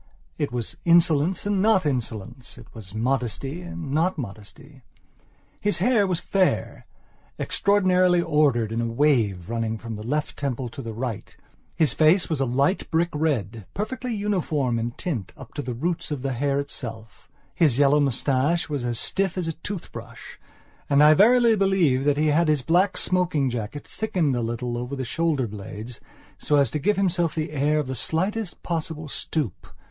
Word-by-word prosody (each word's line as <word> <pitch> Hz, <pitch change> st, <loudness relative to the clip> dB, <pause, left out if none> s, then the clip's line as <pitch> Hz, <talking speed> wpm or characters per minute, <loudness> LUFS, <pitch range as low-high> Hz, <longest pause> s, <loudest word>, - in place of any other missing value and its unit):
It -, -, -1 dB
was 120 Hz, -2 st, -4 dB
insolence 170 Hz, +1 st, +3 dB
and 205 Hz, -2 st, +1 dB
not 210 Hz, -4 st, +3 dB
insolence; 120 Hz, -2 st, -4 dB
it -, -, -12 dB
was 105 Hz, -3 st, -11 dB
modesty 135 Hz, +6 st, -2 dB
and 170 Hz, -5 st, -7 dB
not 165 Hz, +5 st, +1 dB
modesty. 125 Hz, +4 st, -9 dB, 0.8 s
His 205 Hz, 0 st, +1 dB
hair 230 Hz, -5 st, +3 dB
was 180 Hz, -3 st, -1 dB
fair, 190 Hz, -1 st, 0 dB, 0.5 s
extraordinarily 185 Hz, -3 st, +3 dB
ordered 140 Hz, -9 st, +2 dB
in 115 Hz, +1 st, -1 dB
a 115 Hz, -, -1 dB
wave, 115 Hz, -, +1 dB
running 115 Hz, -1 st, -2 dB
from 115 Hz, +1 st, -7 dB
the -, -, -7 dB
left 150 Hz, +6 st, -2 dB
temple 130 Hz, -3 st, -3 dB
to 135 Hz, -, -8 dB
the 115 Hz, -3 st, -6 dB
right; 120 Hz, -3 st, -5 dB, 0.4 s
his 155 Hz, -3 st, +3 dB
face 160 Hz, +4 st, +4 dB
was 155 Hz, -, 0 dB
a 135 Hz, -, +2 dB
light 140 Hz, +10 st, +1 dB
brick 170 Hz, +1 st, +1 dB
red, 115 Hz, -, -1 dB
perfectly 240 Hz, +3 st, -3 dB
uniform 160 Hz, -, 0 dB
in 115 Hz, +1 st, -1 dB
tint 120 Hz, -, -4 dB
up 135 Hz, -, -12 dB
to 145 Hz, -, -3 dB
the 125 Hz, -3 st, -5 dB
roots 165 Hz, +7 st, -2 dB
of 145 Hz, -4 st, -4 dB
the 135 Hz, -1 st, -1 dB
hair 140 Hz, +3 st, 0 dB
itself; 115 Hz, -6 st, -7 dB, 0.2 s
his 150 Hz, -8 st, +3 dB
yellow 145 Hz, +1 st, +5 dB
moustache 140 Hz, +3 st, +1 dB
was 145 Hz, -5 st, -3 dB
as 120 Hz, -1 st, -1 dB
stiff 190 Hz, -2 st, 0 dB
as 180 Hz, -3 st, -1 dB
a 165 Hz, -, -1 dB
toothbrush 170 Hz, +4 st, -8 dB, 0.5 s
and 140 Hz, +1 st, +5 dB
I 150 Hz, +1 st, +8 dB
verily 235 Hz, +5 st, +5 dB
believe 185 Hz, -10 st, +2 dB
that 145 Hz, -1 st, +2 dB
he 155 Hz, +1 st, +2 dB
had 160 Hz, +3 st, +3 dB
his 150 Hz, -4 st, +2 dB
black 180 Hz, +6 st, +2 dB
smoking 170 Hz, -8 st, +1 dB
jacket 120 Hz, +4 st, -5 dB
thickened 175 Hz, -11 st, -1 dB
a 120 Hz, -, -1 dB
little 120 Hz, +1 st, -3 dB
over 125 Hz, +3 st, -4 dB
the 130 Hz, -1 st, -4 dB
shoulder 160 Hz, -2 st, 0 dB
blades 110 Hz, +2 st, -8 dB, 0.4 s
so 150 Hz, -, +1 dB
as 140 Hz, -2 st, +3 dB
to 150 Hz, -, -2 dB
give 205 Hz, +6 st, +1 dB
himself 175 Hz, -4 st, +1 dB
the 155 Hz, -1 st, -2 dB
air 150 Hz, +1 st, +1 dB
of 150 Hz, -, 0 dB
the 130 Hz, -, -4 dB
slightest 185 Hz, -, -1 dB
possible 160 Hz, -2 st, -3 dB
stoop. 140 Hz, -, -4 dB
145 Hz, 175 wpm, -24 LUFS, 120-175 Hz, 0.8 s, I